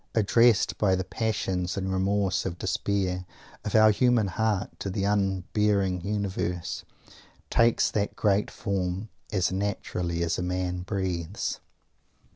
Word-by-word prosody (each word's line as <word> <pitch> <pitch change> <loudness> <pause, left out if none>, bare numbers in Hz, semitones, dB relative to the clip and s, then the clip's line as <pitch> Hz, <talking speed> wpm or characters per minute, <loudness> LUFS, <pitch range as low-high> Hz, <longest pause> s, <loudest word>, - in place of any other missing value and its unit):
addressed 115 +1 +4
by 95 -3 +3
the 95 - -1
passion 95 -2 -1
and 95 -1 -2
remorse 95 0 +1
and 90 -2 -4
despair 95 -2 -1 0.4
of 105 - -2
our 110 0 +7
human 120 -2 +3
heart 105 0 0
to 100 - -3
the 95 +1 -2
unhearing 100 -1 +1
Universe, 95 -3 -2 0.7
takes 115 0 +3
that 105 -1 -1
great 105 -1 +2
form 95 0 -2 0.2
as 95 -4 +1
naturally 90 -3 -2
as 85 0 0
a - - -1
man 90 0 -2
breathes. 95 -1 -3
95 Hz, 125 wpm, -27 LUFS, 90-105 Hz, 0.7 s, our